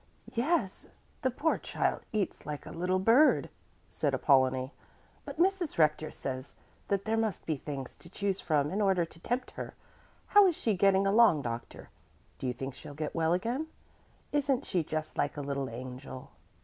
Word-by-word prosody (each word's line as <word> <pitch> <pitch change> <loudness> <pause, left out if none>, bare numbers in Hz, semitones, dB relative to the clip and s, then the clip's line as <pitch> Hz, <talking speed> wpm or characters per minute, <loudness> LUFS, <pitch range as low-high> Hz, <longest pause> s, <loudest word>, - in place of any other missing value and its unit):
"Yes, 240 - 0 0.3
the 260 - +2
poor 295 +6 0
child - - -1
eats 210 -4 -2
like 150 -1 -6
a - - -8
little 180 +2 0
bird," 230 +11 +4 0.4
said - - 0
Apollonie; 130 -2 +3 0.5
"but - - -7
Mrs. 365 -1 +1
Rector 155 -1 +3
says 130 0 -5 0.3
that 200 -1 0
there 220 0 +1
must 220 -3 -1
be 160 - 0
things 135 -2 -6
to 170 - -13
choose 200 +1 -1
from 150 -3 +1
in 200 +3 0
order 190 -4 +3
to 165 - -14
tempt 245 +8 -2
her. - - -7 0.5
How 410 -1 +7
is 350 - +1
she 220 - +1
getting 195 +1 +4
along, 195 -7 +5
doctor? 115 0 -6 0.5
Do 130 - -3
you 125 - 0
think 135 +2 -5
she'll 145 - -10
get 155 0 -3
well 165 0 +2
again? 235 - -1 0.6
Isn't 280 -2 +1
she 175 -3 0
just 155 0 -4
like 145 - 0
a - - -2
little 140 -1 -2
angel?" 130 +2 -8
180 Hz, 175 wpm, -31 LUFS, 140-225 Hz, 0.6 s, How